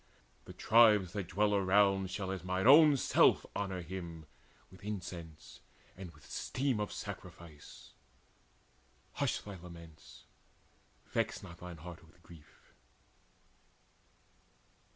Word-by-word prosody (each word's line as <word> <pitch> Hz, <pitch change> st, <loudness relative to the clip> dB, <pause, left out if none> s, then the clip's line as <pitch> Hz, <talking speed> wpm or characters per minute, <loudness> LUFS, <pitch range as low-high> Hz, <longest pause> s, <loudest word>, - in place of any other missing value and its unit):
The -, -, -10 dB
tribes 105 Hz, -5 st, +4 dB
that 100 Hz, -4 st, -4 dB
dwell 105 Hz, +2 st, +1 dB
Around 95 Hz, -1 st, +3 dB
shall 95 Hz, 0 st, -4 dB
as 95 Hz, -2 st, -5 dB
mine 95 Hz, +2 st, -2 dB
own 145 Hz, +2 st, +8 dB
self -, -, +3 dB
honour 95 Hz, -3 st, -3 dB
him 85 Hz, -2 st, -7 dB, 0.5 s
With 95 Hz, 0 st, -16 dB
incense 90 Hz, -6 st, -8 dB, 0.4 s
and 95 Hz, -2 st, -9 dB
with 75 Hz, -3 st, -18 dB
steam 130 Hz, -4 st, -2 dB
of 105 Hz, -, -3 dB
sacrifice. 80 Hz, -4 st, -10 dB, 1.2 s
Hush -, -, -1 dB
thy 100 Hz, -2 st, -9 dB
laments, 85 Hz, -3 st, -13 dB, 0.8 s
vex -, -, -2 dB
not 85 Hz, 0 st, -11 dB
thine 90 Hz, -1 st, -9 dB
heart 85 Hz, +1 st, -10 dB
with 80 Hz, +2 st, -22 dB
grief." 80 Hz, -4 st, -18 dB
95 Hz, 110 wpm, -33 LUFS, 85-100 Hz, 1.2 s, own